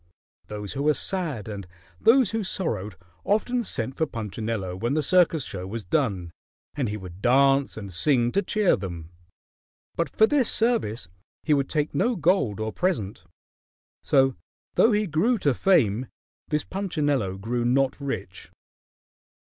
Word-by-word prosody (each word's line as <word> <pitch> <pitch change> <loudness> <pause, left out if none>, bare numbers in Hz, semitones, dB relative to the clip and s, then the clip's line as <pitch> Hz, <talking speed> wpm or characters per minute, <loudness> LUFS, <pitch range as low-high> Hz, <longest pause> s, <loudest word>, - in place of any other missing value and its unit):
Those 105 -2 -6
who 140 - -3
were 150 +1 +3
sad 155 - -3
and 100 -4 -6 0.3
those 235 0 +5
who 225 -1 -1
sorrowed 105 - -3 0.3
often 240 +4 +1
sent 130 - -2
for 160 - 0
Punchinello 110 -4 -4
when 120 +9 -1
the 155 - +1
circus 165 -2 +3
show 95 -5 -6
was 110 +2 -5
done, 95 - -1 0.4
and 130 -6 -1
he 105 - -3
would 95 -1 -10
dance 135 +2 +3
and 100 -3 -7
sing 120 - +2
to 200 - +2
cheer 205 0 +2
them. 85 -4 -7 0.8
But 170 -3 -1
for 220 - +4
this 265 -1 +2
service 220 - 0 0.4
he 155 - +2
would 140 -2 +1
take 150 -1 -1
no 245 +1 +1
gold 160 - +1
or 110 0 -3
present. 110 - -2 0.8
So 135 -2 +3 0.4
though 230 - +4
he 210 0 +2
grew 200 +9 +1
to 145 -8 +1
fame, 125 - +2 0.4
this 150 -1 0
Punchinello 145 - -1
grew 120 +5 -2
not 130 +2 +2
rich. 105 -10 -5
135 Hz, 150 wpm, -25 LUFS, -, 0.8 s, those